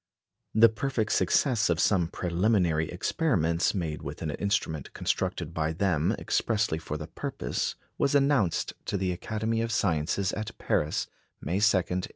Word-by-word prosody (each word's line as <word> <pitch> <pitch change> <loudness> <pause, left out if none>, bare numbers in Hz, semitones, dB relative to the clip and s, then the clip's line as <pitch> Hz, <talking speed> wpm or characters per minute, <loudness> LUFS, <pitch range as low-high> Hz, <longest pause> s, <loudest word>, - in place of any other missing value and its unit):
The 115 +1 +8
perfect 115 0 -1
success 120 -8 +2
of 85 -2 +1
some 90 -5 +3
preliminary 90 -2 +1
experiments 90 - +1
made 80 -5 -3
with 75 +3 -6
an 80 - -2
instrument 80 -5 -2
constructed 80 - -2
by 80 -1 -1
them 85 -3 +1
expressly 105 -8 0
for 75 -2 -5
the 75 - -6
purpose - - -3 0.2
was 140 - +2
announced 140 - +2
to 100 - -1
the 95 -1 0
Academy 110 +5 -2
of 115 0 -2
Sciences 90 0 0
at 110 +1 -5
Paris, 75 +1 0 0.3
May 90 +6 -1
2, 105 -1 +5
1885. 90 0 -2
95 Hz, 150 wpm, -28 LUFS, 80-110 Hz, 0.3 s, The